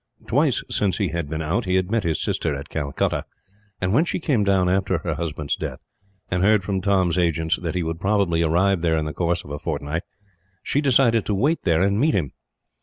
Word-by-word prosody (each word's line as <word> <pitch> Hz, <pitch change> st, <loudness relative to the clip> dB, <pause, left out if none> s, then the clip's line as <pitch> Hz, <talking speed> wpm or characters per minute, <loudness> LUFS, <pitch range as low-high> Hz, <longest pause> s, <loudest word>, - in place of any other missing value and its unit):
Twice -, -, +1 dB
since 95 Hz, -4 st, 0 dB
he -, -, 0 dB
had 85 Hz, -2 st, -3 dB
been 80 Hz, +1 st, -3 dB
out 85 Hz, +9 st, -1 dB
he 90 Hz, 0 st, 0 dB
had 95 Hz, +1 st, 0 dB
met 115 Hz, -1 st, +2 dB
his 85 Hz, -5 st, -1 dB
sister 75 Hz, -, -1 dB
at 70 Hz, +1 st, -8 dB
Calcutta, 70 Hz, -3 st, -1 dB, 0.6 s
and 95 Hz, +1 st, 0 dB
when 145 Hz, +8 st, +4 dB
she 175 Hz, -, -2 dB
came 135 Hz, -10 st, +1 dB
down 95 Hz, -2 st, +2 dB
after 95 Hz, 0 st, +1 dB
her 85 Hz, 0 st, -3 dB
husband's 75 Hz, -2 st, -3 dB
death, -, -, -5 dB, 0.5 s
and 90 Hz, 0 st, +1 dB
heard 105 Hz, 0 st, +4 dB
from 95 Hz, 0 st, -2 dB
Tom's 95 Hz, -3 st, +2 dB
agents 80 Hz, -1 st, +1 dB
that 85 Hz, -1 st, -3 dB
he 90 Hz, -, 0 dB
would 80 Hz, 0 st, -3 dB
probably 95 Hz, -5 st, +2 dB
arrive 85 Hz, +3 st, +2 dB
there 80 Hz, -1 st, +2 dB
in 80 Hz, -, -1 dB
the 75 Hz, -, -4 dB
course 85 Hz, +2 st, -1 dB
of 70 Hz, -, -11 dB
a 75 Hz, -, -4 dB
fortnight, 75 Hz, +4 st, -3 dB, 0.6 s
she 145 Hz, -, 0 dB
decided 120 Hz, -5 st, +3 dB
to 105 Hz, -, +1 dB
wait 145 Hz, +11 st, +1 dB
there 85 Hz, -1 st, +3 dB
and 100 Hz, +1 st, +1 dB
meet 150 Hz, +4 st, +3 dB
him. 75 Hz, -8 st, -1 dB
90 Hz, 220 wpm, -23 LUFS, 80-100 Hz, 0.6 s, when